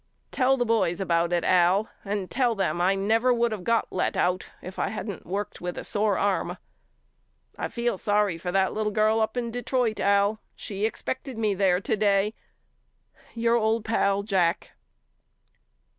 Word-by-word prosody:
Tell 265 0 +2
the 245 - +1
boys 220 -6 +1
about 170 -2 +1
it 175 -1 +1
Al 185 +4 +3 0.2
and 200 -2 -3
tell 245 -3 +1
them 175 -4 -1
I 190 +2 +3
never 225 +6 +2
would 235 -2 +1
of 200 -4 -6
got 230 +3 0
let 185 - -1
out 180 +1 0
if 185 +1 -9
I - - +1
hadn't 210 -3 -6
worked 200 +3 -4
with 180 0 -4
a - - -4
sore 205 -2 0
arm. 200 -2 0 1.0
I - - -3
feel 235 -5 -2
sorry 205 -5 +1
for 180 +1 -3
that 190 0 +1
little 215 0 -1
girl 215 +1 +2
up 220 +2 -1
in 235 -1 -2
Detroit 245 -1 -1
Al. 200 +2 +2 0.2
She 205 +1 -2
expected 260 +2 -5
me 215 -2 +1
there 185 -2 +2
today. 205 0 +1 1.0
Your 230 0 +2
old 220 0 0
pal, 200 -3 +1
JACK. 185 -5 0
205 Hz, 165 wpm, -26 LUFS, 190-225 Hz, 1.0 s, Al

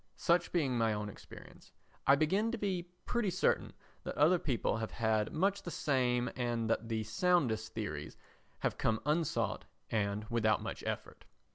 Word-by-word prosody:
Such 170 0 +2
being 145 -8 +1
my 115 -1 +3
own 105 0 -3
experience, - - -13 0.4
I 140 - +8
begin 190 +10 +2
to 240 - -2
be 185 -4 -2 0.2
pretty 240 -4 0
certain 180 - +1 0.3
that - - -5
other 165 +5 +5
people 125 -6 0
have 110 -1 -3
had 110 -2 0
much 195 +5 +1
the 175 - -6
same 125 -6 +1
and 120 -2 -1
that 115 0 -1
the 110 -1 -1
soundest 120 - +1
theories 75 -10 -4 0.4
have - - -1
come 110 -1 +1
unsought 155 +1 0 0.3
and 105 -1 0
without 110 -2 +2
much - - -5
effort. - - -5
125 Hz, 160 wpm, -34 LUFS, 110-175 Hz, 0.4 s, I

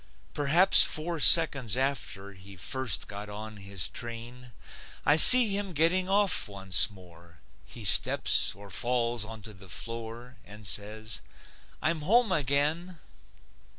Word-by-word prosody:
Perhaps 155 +6 +3
four 165 +1 0
seconds 140 - +4
after 130 -7 -8
He 95 +1 -18
first 125 +8 -4
got 105 0 -13
on 110 +1 -13
his 100 -3 -4
train, 120 +3 -13 0.5
I 145 - +1
see 220 +5 +9
him 200 -2 -8
getting 175 +5 -3
off 200 - -3
once 95 -1 -2
more. 85 -4 -22 0.3
He - - -12
steps - - 0
or 100 0 -17
falls 120 +1 -4
onto 110 -1 -14
the 95 -1 -18
floor 115 +4 -11
And 105 -1 -18
says, 105 +3 -7 0.6
"I'm 160 -1 -5
home 220 +6 -2
again." 150 +4 -3
120 Hz, 125 wpm, -23 LUFS, 100-155 Hz, 0.6 s, see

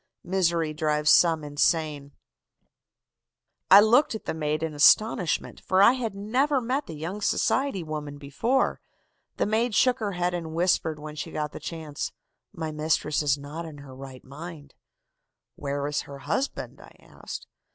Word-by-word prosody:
MISERY 170 -4 0
DRIVES 150 -1 +2
SOME 165 -2 +5
INSANE. 145 -1 0 1.6
"I 195 - +10
looked 230 +4 +4
at 220 - -7
the - - -2
maid 155 0 -2
in 160 -1 -2
astonishment, 170 +2 +3
for 185 - +1
I 230 - +8
had 235 -6 -3
never 260 +8 +1
met 260 +4 -2
the 160 - -7
young 170 +7 -5
society 260 -1 +1
woman 150 -2 -6
before. 145 - 0 0.6
The - - +1
maid 220 +2 0
shook 255 +2 +3
her 205 -3 -2
head 180 0 -1
and 165 -2 -4
whispered 170 -2 +1
when 150 0 -8
she 150 - -5
got 150 -1 -3
the - - -8
chance: 160 -4 -5 0.4
"'My 160 -1 -5
mistress 155 0 0
is 145 -1 +2
not 145 +4 -7
in 160 -3 -9
her 140 -2 -11
right 130 -1 -10
mind.' 145 +1 -10 0.8
"'Where 140 0 -3
is 145 0 -1
her 140 - -10
husband?' 160 - -3
I - - -16
asked. - - -9
160 Hz, 160 wpm, -26 LUFS, 150-200 Hz, 1.6 s, I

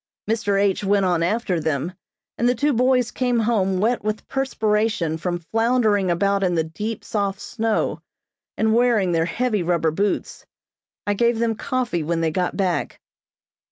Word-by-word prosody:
Mr. 210 -3 +1
H. 200 0 +1
went 200 0 +2
on 175 -2 +1
after 185 0 0
them, 155 +2 -2 0.4
and 240 - +2
the 245 - +2
two 290 +5 +1
boys 250 0 +2
came 250 -2 0
home 210 -5 +1
wet 230 +3 +1
with 215 0 -3
perspiration 215 - 0
from 175 +2 -2
floundering 220 +1 +1
about 195 +3 +1
in 180 -2 +1
the 160 - +2
deep, 210 +8 -5
soft 200 -2 -2
snow, 225 -2 -1 0.6
and 220 0 +2
wearing 230 -6 +3
their 165 -1 +2
heavy 220 +3 0
rubber 170 -2 +1
boots. 200 +6 -2 0.6
I 205 - +1
gave 235 +2 +2
them 230 0 +1
coffee 240 -6 -2
when 165 +2 -1
they 160 -1 +1
got 180 +2 -1
back. 185 -3 -1
205 Hz, 160 wpm, -22 LUFS, 180-230 Hz, 0.6 s, wearing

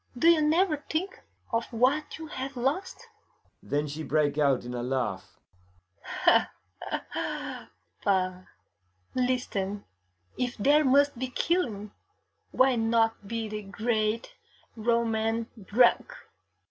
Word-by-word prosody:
'Do 330 +7 +5
you 335 -2 +5
never 315 +2 +3
think 340 +5 -2 0.3
of 230 0 +1
what 260 +6 +1
you 320 - -7
have 270 -3 -6
lost?' 340 - -2 0.5
Then 145 +1 -1
she 150 +2 -5
break 150 -2 +1
out 140 -4 +2
in 125 - -5
a 120 - -3
laugh. 130 0 -3 0.9
'Pah! - - +6 2.7
Listen: 215 -6 -1 0.5
if 245 -1 -1
there 290 +8 +4
must 280 -1 +3
be 260 - -1
killing, 240 - -1 0.6
why 260 0 +3
not 225 -2 +1
be 230 +1 -3
the 215 0 -5
great 215 - -1 0.4
Roman 225 0 0
drunk! 240 - +3
235 Hz, 110 wpm, -28 LUFS, 210-280 Hz, 2.7 s, Pah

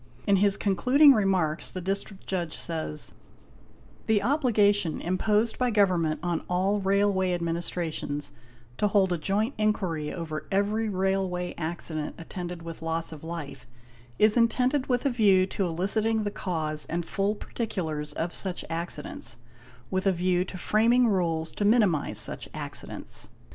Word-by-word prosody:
In 200 -1 +4
his 200 0 +4
concluding 260 - +5
remarks 185 -8 +1
the 185 - -5
District 195 +1 -4
Judge 175 -4 -3
says: 160 -2 -3 0.9
''The 220 -2 +3
obligation 210 - +2
imposed 210 +5 +1
by 250 -1 +2
Government 180 -8 +2
on 175 -2 0
all 190 +3 +1
Railway 195 -1 +2
Administrations 165 -3 -3 0.5
to 210 - +3
hold 195 -3 +3
a 170 - -2
joint 210 - 0
inquiry 185 -8 0
over 155 -3 -5
eyery 210 +3 +1
railway 190 -2 -1
accident 160 -2 -4
attended 175 0 -6
with 165 -1 -8
loss 165 0 -2
of 155 -1 -10
life 160 -6 -7 0.5
is 215 +2 +4
intended 255 +4 +2
with 245 +1 0
a 275 - +3
view 200 -6 +4
to 190 0 -2
eliciting 215 +6 0
the 205 - -2
cause 155 -6 -3
and 170 +1 -2
full 200 +4 0
particulars 160 -10 -4
of 170 +1 -3
such 185 -2 -3
accidents 230 - -4 0.5
with 190 +1 0
a - - +5
view 180 0 +1
to 190 - -7
framing 230 +6 +3
rules 165 -5 0
to - - -3
minimise 205 -8 +3
such - - +1
accidents. - - -5
190 Hz, 145 wpm, -27 LUFS, 170-210 Hz, 0.9 s, concluding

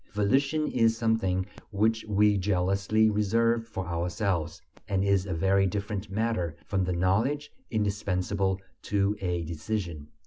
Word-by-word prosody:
Volition 135 +9 +2
is 115 -2 +3
something 110 -5 +1 0.2
which 110 +2 +1
we 105 0 +3
jealously 100 +3 +2
reserve 115 +2 +2
for 95 -4 -5
ourselves, 85 0 -2 0.3
and 95 -2 +1
is 100 -1 +2
a 90 - -2
very 95 +3 +3
different 100 +1 -3
matter 95 -5 -1
from 95 -2 0
the 90 - -1
knowledge 105 +12 +1 0.2
indispensable 100 -2 0 0.2
to 100 0 +1
a 90 -2 -1
decision. 85 -1 -4
100 Hz, 130 wpm, -28 LUFS, 90-110 Hz, 0.3 s, is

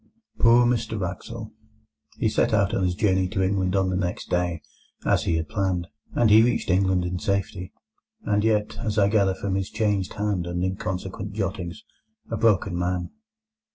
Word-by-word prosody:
Poor 120 +1 +6
Mr 115 -3 0
Wraxall! 90 -3 -5 0.7
He - - +1
set - - +2
out - - +2
on 95 - +1
his 90 -1 0
journey 95 -3 +2
to 95 0 -1
England 95 -1 0
on 95 -1 +2
the - - -1
next 90 -1 -3
day, 85 -3 0 0.4
as - - +2
he 85 - +1
had 80 0 -1
planned, 95 -4 -1 0.3
and 115 -3 +4
he 110 +1 +8
reached 115 -4 +1
England 95 -1 +2
in 90 0 -3
safety; 100 -1 -2 0.5
and 105 0 +1
yet, 105 -1 +1
as 110 -2 -2
I 100 -1 +4
gather 100 -3 +2
from 95 0 -3
his 95 0 -1
changed 105 -4 0
hand 100 -4 -1
and 90 +1 -2
inconsequent 95 +1 -4
jottings, 95 -4 -4 0.5
a 115 - -1
broken 105 -4 +2
man. 90 0 -2
95 Hz, 175 wpm, -25 LUFS, 90-105 Hz, 0.7 s, he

